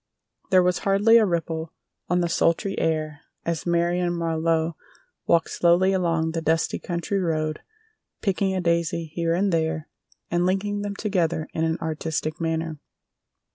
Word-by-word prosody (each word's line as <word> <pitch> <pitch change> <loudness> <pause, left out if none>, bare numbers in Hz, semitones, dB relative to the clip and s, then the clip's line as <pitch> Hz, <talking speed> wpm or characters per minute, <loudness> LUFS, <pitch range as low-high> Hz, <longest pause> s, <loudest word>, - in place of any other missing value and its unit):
There 185 -1 +5
was 180 0 +1
hardly 205 +4 +5
a 215 - +3
ripple 165 -2 -2 0.4
on 175 +1 +2
the 175 - +1
sultry 170 +4 +1
air 155 -2 -1 0.2
as 170 0 -2
Marion 175 +1 +1
Marlowe 165 -1 0 0.5
walked 170 -1 +3
slowly 180 +3 +3
along 165 -3 +1
the 165 0 -3
dusty 160 0 +1
country 175 +3 -2
road 155 -3 -1 0.6
picking 195 -1 0
a 185 - 0
daisy 170 0 0
here 165 0 0
and 195 +1 +1
there 160 -1 -1 0.4
and 175 +1 +2
linking 200 +3 0
them 205 0 -4
together 175 -7 0
in 160 - 0
an 160 0 0
artistic 160 0 -3
manner. 160 -1 -2
170 Hz, 145 wpm, -24 LUFS, 160-185 Hz, 0.6 s, There